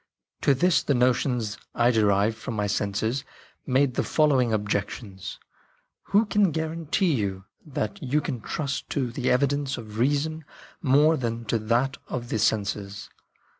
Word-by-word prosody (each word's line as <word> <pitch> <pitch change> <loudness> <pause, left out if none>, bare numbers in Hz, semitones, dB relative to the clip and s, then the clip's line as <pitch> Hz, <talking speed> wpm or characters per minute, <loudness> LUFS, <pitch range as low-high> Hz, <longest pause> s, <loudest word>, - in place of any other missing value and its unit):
" - - -56
To 140 - +4
this 180 +6 +3
the 140 - +1
notions 125 -3 +1 0.2
I 120 +1 +4
derived 105 -1 +3
from 110 +1 -6
my 105 -1 0
senses 105 +5 -1 0.4
made 130 0 +3
the - - 0
following 135 -6 +3
objections: 100 -2 -3 0.3
" - - -42
Who 205 +3 +3
can 205 -2 +3
guarantee 160 +2 0
you 95 -6 -2 0.2
that 185 +7 -3
you 140 +1 +1
can 130 -5 -4
trust 140 +3 -3
to 130 -4 -1
the 125 +1 -1
evidence 140 +1 +1
of 110 -1 -8
reason 145 +5 +1 0.4
more 150 +4 +4
than 115 -2 -3
to 115 +2 0
that 120 +5 +1
of 120 -1 -4
the 110 - -1
senses 100 -1 -1
125 Hz, 155 wpm, -26 LUFS, 110-145 Hz, 0.4 s, To